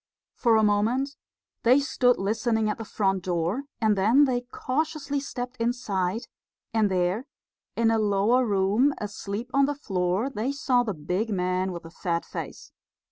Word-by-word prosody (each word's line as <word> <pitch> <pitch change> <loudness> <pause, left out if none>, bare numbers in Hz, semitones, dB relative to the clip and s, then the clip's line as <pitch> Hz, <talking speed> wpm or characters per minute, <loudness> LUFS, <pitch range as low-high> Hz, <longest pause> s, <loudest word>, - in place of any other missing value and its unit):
For 230 -2 +3
a 220 - +3
moment 230 +7 +1 0.5
they 250 +4 +5
stood 250 -3 +2
listening 220 +2 0
at - - -6
the - - -4
front 195 -3 0
door, 180 +8 -1
and 215 -2 +3
then 225 +9 +5
they 250 -2 0
cautiously 285 +1 -2
stepped 250 -2 -6
inside; 225 -4 -1 0.5
and 220 -2 +3
there, 185 +7 0 0.5
in 230 -1 +3
a 225 - +2
lower 210 +4 +3
room, 210 +6 +2
asleep 210 +3 -5
on 275 0 +4
the 290 - -1
floor, 190 -3 -1
they 240 +4 -2
saw 265 -4 +2
the 215 -6 -2
big 180 +9 -2
man 185 -1 0
with 170 -1 -7
the 165 - -11
fat 170 -1 -2
face. - - -7
220 Hz, 160 wpm, -26 LUFS, 195-250 Hz, 0.5 s, they